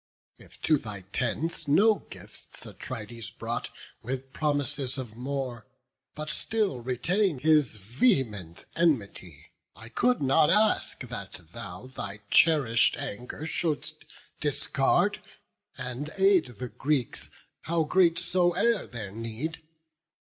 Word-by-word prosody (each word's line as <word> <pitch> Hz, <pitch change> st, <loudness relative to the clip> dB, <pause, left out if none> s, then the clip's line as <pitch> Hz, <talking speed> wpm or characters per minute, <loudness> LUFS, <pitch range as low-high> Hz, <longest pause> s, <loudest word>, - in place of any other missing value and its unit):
If -, -, -16 dB
to 155 Hz, -3 st, +4 dB
thy 105 Hz, -5 st, -7 dB
tent 130 Hz, -, -2 dB
no 205 Hz, +10 st, +6 dB, 0.2 s
gifts -, -, -8 dB
Atrides 115 Hz, -2 st, -5 dB
brought, -, -, -4 dB, 0.3 s
With 130 Hz, +2 st, -5 dB
promises 145 Hz, -3 st, 0 dB
of 120 Hz, -5 st, -5 dB
more, 125 Hz, -3 st, -4 dB, 0.5 s
but 155 Hz, 0 st, -4 dB
still 205 Hz, -, 0 dB
retain'd 150 Hz, -, +1 dB
His 150 Hz, -7 st, +4 dB
vehement 105 Hz, -, 0 dB
enmity, 100 Hz, -, 0 dB, 0.2 s
I 115 Hz, -, -11 dB
could 250 Hz, -, +2 dB
not 145 Hz, +3 st, +4 dB
ask 215 Hz, +1 st, +3 dB
That 105 Hz, -6 st, -7 dB, 0.2 s
thou 100 Hz, -3 st, -7 dB
thy 105 Hz, -5 st, -6 dB
cherish'd 140 Hz, -9 st, +5 dB
anger 125 Hz, +8 st, -5 dB
shouldst 160 Hz, -2 st, -2 dB, 0.3 s
discard, -, -, +2 dB, 0.6 s
And 130 Hz, +3 st, -4 dB
aid 195 Hz, -3 st, +5 dB
the 125 Hz, +2 st, -4 dB
Greeks, 140 Hz, -2 st, -1 dB, 0.4 s
how 165 Hz, 0 st, +2 dB
great 170 Hz, +1 st, +4 dB
so 175 Hz, 0 st, +2 dB
e'er 230 Hz, 0 st, +2 dB
their 110 Hz, -5 st, -6 dB
need. 115 Hz, +9 st, -4 dB
135 Hz, 115 wpm, -28 LUFS, 115-165 Hz, 0.6 s, no